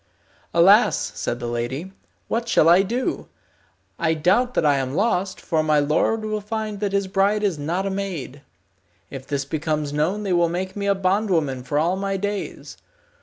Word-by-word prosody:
"Alas!" - - +4
said 120 - -3
the 120 - -5
lady, 120 +9 -3 0.4
"what 235 +1 -2
shall 160 - +4
I 175 +3 +7
do? 235 +6 -2 0.7
I 160 -2 +1
doubt 200 +11 +2
that - - +2
I 145 -2 +4
am 135 0 -2
lost, 195 -2 0
for 160 -3 0
my 155 -1 +2
lord 155 +10 +1
will 215 -1 -2
find 215 -1 -4
that 205 -1 -1
his 200 0 +1
bride 195 +2 +1
is 190 -7 0
not 170 +6 -2
a 195 - -1
maid. 180 -9 -5 0.7
If 135 -1 -8
this 140 -1 -2
becomes 150 -1 -2
known 175 +8 0
they 195 -3 0
will 170 -1 +3
make 185 +2 -4
me 200 -1 -3
a 200 - +3
bondwoman 185 -8 0
for 135 +4 -3
all 170 +5 +1
my 195 0 -2
days. 205 +1 -5
185 Hz, 180 wpm, -22 LUFS, 150-200 Hz, 0.7 s, I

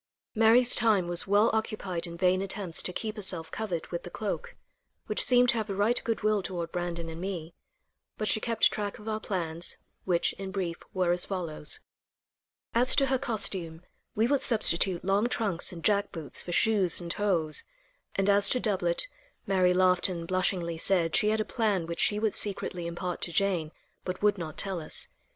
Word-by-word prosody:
Mary's 230 +2 +5
time 215 -6 +3
was 175 +2 +1
well 205 +3 +3
occupied 200 -6 -2
in 170 0 -9
vain 185 +1 +2
attempts 195 -3 0
to - - -1
keep 215 +4 -5
herself 180 -5 -1
covered 185 -7 -4
with 170 - -3
the - - -9
cloak, 210 +3 -5 0.5
which - - 0
seemed 250 -1 +5
to 235 - +3
have 220 -1 -3
a 195 - -3
right 210 +5 +1
good 225 -3 -3
will 215 -1 +2
toward 175 -3 -5
Brandon 175 -2 -4
and 165 +1 -8
me, 175 -4 -5 0.6
but 215 - -2
she 220 - +4
kept 230 0 +2
track 205 -1 -4
of 210 - -13
our 215 0 -2
plans, 170 -5 -4 0.3
which, 175 -2 +1
in 195 -1 -5
brief, 185 -3 -3
were 185 -2 0
as 175 0 +3
follows: 170 -6 -3 0.9
As 245 +2 +4
to 275 - +4
her 265 -1 0
costume, 195 -9 -1 0.3
we 220 - +2
would 275 +2 +1
substitute 190 -6 +2
long 200 +5 +1
trunks 205 -9 0
and 170 -2 -10
jack 205 -1 +1
boots 160 -4 -5
for 175 - -7
shoes 195 -1 +3
and 170 -1 -4
hose, 170 -7 0 0.5
and 195 0 0
as 200 0 +7
to 250 - +2
doublet, - - 0 0.4
Mary 185 -2 +2
laughed 185 0 +3
and 170 -2 -5
blushingly 180 -2 -1
said 170 -3 +2
she 210 - +3
had 220 +1 0
a 215 - -1
plan 210 -7 -1
which 170 0 -6
she 210 - +3
would 215 -1 0
secretly 180 -4 +1
impart 175 +1 -5
to 175 - -1
Jane, 175 -4 0 0.3
but 185 +2 -5
would 205 -2 +2
not 160 -2 -7
tell 190 -4 -1
us. 155 - -1
190 Hz, 190 wpm, -28 LUFS, 175-215 Hz, 0.9 s, as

